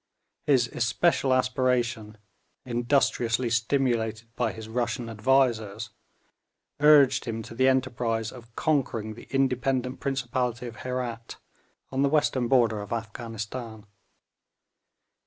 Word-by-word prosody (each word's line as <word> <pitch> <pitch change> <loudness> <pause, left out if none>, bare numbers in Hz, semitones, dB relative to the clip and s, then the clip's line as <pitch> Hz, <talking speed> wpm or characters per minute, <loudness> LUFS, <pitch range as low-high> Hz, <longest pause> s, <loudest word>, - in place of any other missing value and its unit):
His 130 -5 +4
especial 130 +4 +1
aspiration, 125 -4 0 0.5
industriously 120 -1 +1
stimulated 115 -2 0
by 120 -3 0
his 110 -1 -9
Russian 120 0 -2
advisers, 115 -3 +1 0.9
urged 145 -3 +6
him 115 -2 -4
to 115 - -10
the 130 +3 +2
enterprise 120 -4 0
of 115 -2 -14
conquering 120 -8 0
the 110 - -13
independent 130 -1 0
principality 125 -3 -2
of 120 -2 -8
Herat, 125 -2 -4 0.6
on 135 0 0
the 140 - +3
western 140 -4 +1
border 115 -5 +3
of 100 - -9
Afghanistan. 115 0 -6
120 Hz, 105 wpm, -27 LUFS, 115-130 Hz, 0.9 s, urged